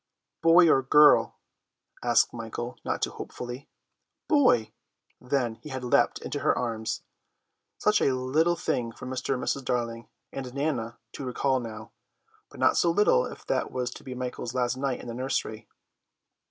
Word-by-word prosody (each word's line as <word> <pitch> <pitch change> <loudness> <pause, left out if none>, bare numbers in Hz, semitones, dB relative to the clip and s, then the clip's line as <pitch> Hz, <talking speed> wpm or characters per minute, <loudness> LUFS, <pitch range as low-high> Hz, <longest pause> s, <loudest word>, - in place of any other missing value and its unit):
"Boy 170 +1 +7
or 135 -4 +5
girl?" 150 +3 +5 0.7
asked 120 -1 +3
Michael, 120 +1 -6
not - - -2
too - - 0
hopefully. 125 +2 -8 0.6
"Boy." 255 - +4 0.5
Then 125 -3 -1
he 150 - -9
had 130 -2 -5
leapt 125 - +3
into - - -3
her - - +2
arms. 115 -2 -3 0.7
Such 210 0 +2
a 130 - +3
little 150 +7 +1
thing 125 -8 -2
for 115 - -11
Mr. 130 +1 -2
and 125 - -4
Mrs. 140 - -1
Darling 115 -2 -2 0.2
and 130 -1 -6
Nana 125 -6 -2
to - - -7
recall 130 +1 0
now, 110 -2 -8 0.6
but - - -14
not - - +3
so 170 - +3
little 210 - +3
if - - -11
that - - -1
was 125 -1 -2
to - - -11
be 130 -2 -7
Michael's 125 -1 -5
last 125 0 +1
night 130 -1 -2
in - - -10
the 120 - -5
nursery. 115 -3 -3
125 Hz, 165 wpm, -27 LUFS, 120-140 Hz, 0.7 s, Boy